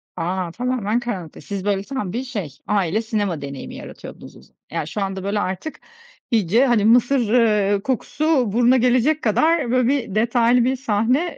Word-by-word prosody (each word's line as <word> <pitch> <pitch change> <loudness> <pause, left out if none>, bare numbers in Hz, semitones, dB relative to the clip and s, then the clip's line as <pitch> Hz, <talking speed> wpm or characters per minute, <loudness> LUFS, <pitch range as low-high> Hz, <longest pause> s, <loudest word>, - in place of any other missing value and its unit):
A, 180 0 -2
tamamen 240 -1 -1
karanlıkta. 190 -10 -6
Siz 200 -1 -6
böyle 200 -1 0
tam 210 -7 -4
bir 250 +3 -2
şey, 210 - -5 0.2
aile 200 0 +1
sinema 205 -8 -2
deneyimi 140 -1 -7
yaratıyordunuz - - -11
o - - -16
za - - -24 0.2
Yani, 150 - -3
şu 205 - -4
anda 190 -1 -3
böyle 205 +1 -1
artık 190 - -4 0.5
iyice 225 +4 +3
hani 230 -5 +2
mısır 245 0 +3
ııı 210 -4 +3
kokusu 265 -1 0
buruna 245 +2 +4
gelecek 255 +5 +2
kadar 295 +4 +2
böyle 250 -1 +2
bir 250 -7 -1
detaylı 235 +2 +3
bir 260 +2 +1
sahne 250 +7 0
225 Hz, 170 wpm, -21 LUFS, 200-250 Hz, 0.5 s, buruna